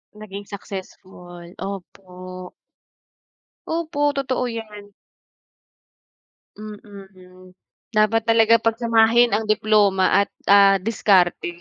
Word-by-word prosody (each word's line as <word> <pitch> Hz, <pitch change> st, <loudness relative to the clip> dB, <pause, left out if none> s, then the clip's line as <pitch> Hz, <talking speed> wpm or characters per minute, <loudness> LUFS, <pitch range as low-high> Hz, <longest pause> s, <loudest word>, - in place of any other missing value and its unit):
Naging 205 Hz, -1 st, -10 dB
successful, 185 Hz, -3 st, -10 dB, 0.2 s
opo. 185 Hz, -1 st, -9 dB, 1.2 s
Opo, 315 Hz, -3 st, -1 dB
totoo 260 Hz, -2 st, -2 dB
'yan. 210 Hz, -3 st, -9 dB, 1.6 s
Mm, 195 Hz, -3 st, -13 dB, 0.4 s
dapat 215 Hz, +1 st, +2 dB
talaga 225 Hz, 0 st, +4 dB
pagsamahin 230 Hz, 0 st, +2 dB
ang 220 Hz, +2 st, 0 dB
diploma 210 Hz, -3 st, +2 dB, 0.2 s
at -, -, -32 dB, 0.2 s
ah, 200 Hz, -1 st, +5 dB
diskarte. 185 Hz, -5 st, +1 dB
205 Hz, 80 wpm, -21 LUFS, 190-225 Hz, 1.6 s, ah